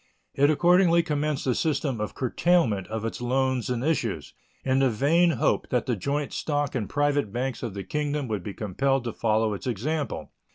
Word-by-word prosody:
It 140 +1 +3
accordingly 170 +2 +4
commenced 150 -2 -1
a 130 - +2
system 140 -5 -1
of 105 - -4
curtailment 130 - +1
of 110 0 -4
its 115 - -4
loans 130 0 0
and 125 -1 -1
issues, 115 - -1 0.3
in 130 0 +2
the 135 -1 +4
vain 155 +10 +3
hope - - +1
that 125 -2 0
the 125 - 0
joint 140 +7 -2
stock 145 -2 -1
and 115 -6 -2
private 145 -6 +1
banks 125 +1 -3
of 115 -5 -5
the 100 - -4
Kingdom 150 0 -2
would 105 -4 -2
be 100 +2 -7
compelled 135 +6 0
to 115 - -4
follow 110 -1 +1
its 100 - -6
example. 140 +6 -3
130 Hz, 190 wpm, -26 LUFS, 115-150 Hz, 0.3 s, accordingly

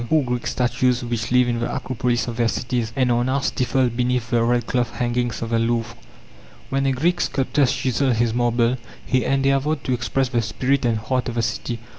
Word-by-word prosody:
Poor 155 -2 +3
Greek 125 -1 -2
statues 125 0 +1
which 120 -2 -3
lived 125 -1 +4
in 120 - -2
the 120 - -2
Acropolis 125 -3 -1
of 120 -1 -5
their 120 -1 +2
cities, 120 -1 -2
and 130 -2 +2
are 120 0 +2
now 130 +2 +1
stifled 125 -2 0
beneath 125 -1 0
the 120 -1 +3
red 120 0 +1
cloth 120 -1 -1
hangings 120 -1 -1
of 115 - -5
the 115 - +2
Louvre! 115 0 -1 0.8
When 135 0 +1
a - - +3
Greek 170 +7 +1
sculptor 135 +1 +1
chiseled 130 -1 +1
his 115 0 +1
marble 120 0 +1 0.3
he 130 -1 +1
endeavored 135 +2 +1
to 130 - -1
express 125 +2 0
the 120 -2 +1
spirit 125 +5 0
and 115 -2 +2
heart 125 +4 -1
of 120 - -5
the 115 - 0
city. 115 +1 -2
125 Hz, 205 wpm, -22 LUFS, 120-130 Hz, 0.8 s, lived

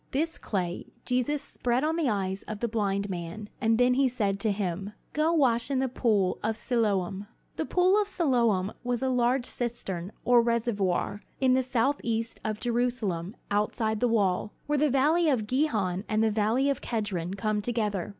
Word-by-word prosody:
This 325 +5 -1
clay 180 -4 -3 0.2
Jesus 255 +3 0
spread 245 +2 -1
on 315 +1 +1
the 325 -6 +1
eyes 195 -2 -1
of 215 -1 -5
the 235 - 0
blind 200 -3 -1
man; 185 +3 -6
and 225 -1 +3
then 250 +1 +4
he 270 +1 +3
said 205 -6 -1
to 215 +1 +1
him: 195 0 -3 0.2
"Go 310 +2 +2
wash 255 -8 +2
in 275 - 0
the 265 0 +1
pool 215 -7 +1
of 220 0 -1
Siloam." 205 -5 0 0.3
The - - -2
pool 370 +3 +4
of 410 - -2
Siloam 235 - +1
was 245 +1 -1
a 265 - +1
large 250 0 +2
cistern, 200 -8 -4
or, 245 -1 +6
reservoir, 215 -4 0 0.2
on 260 -1 +4
the 260 - +4
southeast 235 -2 -1
of 215 -1 -2
Jerusalem, 235 -6 -1 0.2
outside 215 +1 0
the 245 - +2
wall, 205 -3 +1
where 295 -1 +1
the 300 +1 +3
valley 305 +5 +3
of 245 -7 +1
Gihon 210 - 0
and 215 0 +2
the 220 - +3
valley 220 +6 +2
of 280 -2 0
Kedron 195 -6 -2
come 210 +1 0
together. 210 -5 -1
230 Hz, 180 wpm, -28 LUFS, 205-255 Hz, 0.3 s, or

